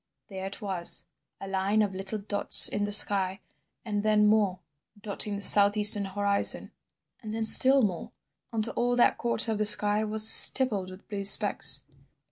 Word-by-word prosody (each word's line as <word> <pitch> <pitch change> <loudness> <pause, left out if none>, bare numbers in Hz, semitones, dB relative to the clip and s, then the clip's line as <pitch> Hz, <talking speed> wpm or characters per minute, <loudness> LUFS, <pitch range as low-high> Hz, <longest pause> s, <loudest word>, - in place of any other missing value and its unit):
There 190 -1 -10
it 200 +2 -12
was—a 190 0 -9
line 195 +3 -4
of 200 -2 -7
little 195 +3 -4
dots 205 0 +3
in 205 0 -6
the 205 - -8
sky—and 200 +1 -2
then 210 0 -2
more, 210 -4 -2 0.4
dotting 205 0 -5
the 200 - -7
south 205 +1 +4
eastern 210 -1 +4
horizon, 200 +1 -2 0.5
and 220 -2 -11
then 225 0 -6
still 265 +4 +3
more, 205 +3 -7 0.4
until 225 0 -5
all 245 0 -4
that 245 - -2
quarter 235 -1 -3
of 215 - -7
the 215 - -3
sky 210 0 +1
was 215 0 +3
stippled 215 -7 +5
with 185 +1 -18
blue 200 -1 -9
specks. 195 - +1
205 Hz, 160 wpm, -23 LUFS, 195-215 Hz, 0.5 s, stippled